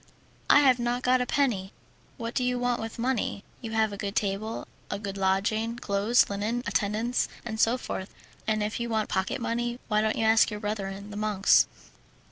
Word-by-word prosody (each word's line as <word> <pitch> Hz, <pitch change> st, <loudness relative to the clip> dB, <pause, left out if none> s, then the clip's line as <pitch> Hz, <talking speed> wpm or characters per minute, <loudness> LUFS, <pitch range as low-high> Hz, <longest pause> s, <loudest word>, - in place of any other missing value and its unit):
I 290 Hz, -, +8 dB
have 260 Hz, -3 st, +5 dB
not 240 Hz, +1 st, -1 dB
got 255 Hz, 0 st, +3 dB
a 250 Hz, -, -1 dB
penny." 220 Hz, -10 st, 0 dB, 0.4 s
"What 230 Hz, -2 st, -4 dB
do 255 Hz, -, 0 dB
you 250 Hz, 0 st, +1 dB
want 245 Hz, -1 st, 0 dB
with 225 Hz, 0 st, -6 dB
money? 235 Hz, -4 st, -1 dB, 0.2 s
You 225 Hz, -2 st, -6 dB
have 220 Hz, -2 st, +2 dB
a -, -, -6 dB
good 200 Hz, 0 st, -4 dB
table, 215 Hz, +1 st, -2 dB, 0.2 s
a -, -, -2 dB
good 200 Hz, -1 st, -5 dB
lodging, 205 Hz, +4 st, 0 dB
clothes, 215 Hz, +1 st, +3 dB
linen, 215 Hz, +4 st, -2 dB
attendance, 220 Hz, +4 st, 0 dB, 0.2 s
and 220 Hz, -2 st, -4 dB
so 230 Hz, +3 st, +4 dB
forth. 190 Hz, -6 st, -5 dB, 0.4 s
And 215 Hz, -1 st, +1 dB
if 210 Hz, +3 st, -2 dB
you 235 Hz, 0 st, -2 dB
want 220 Hz, -2 st, 0 dB
pocket 190 Hz, +7 st, -1 dB
money, 240 Hz, +1 st, -2 dB
why 210 Hz, -1 st, +3 dB
don't 220 Hz, 0 st, 0 dB
you 225 Hz, -, +1 dB
ask 220 Hz, 0 st, +5 dB
your 210 Hz, -1 st, -5 dB
brethren 205 Hz, -1 st, -4 dB
the 205 Hz, -, -6 dB
monks?" 210 Hz, -2 st, +4 dB
220 Hz, 195 wpm, -27 LUFS, 205-240 Hz, 0.4 s, I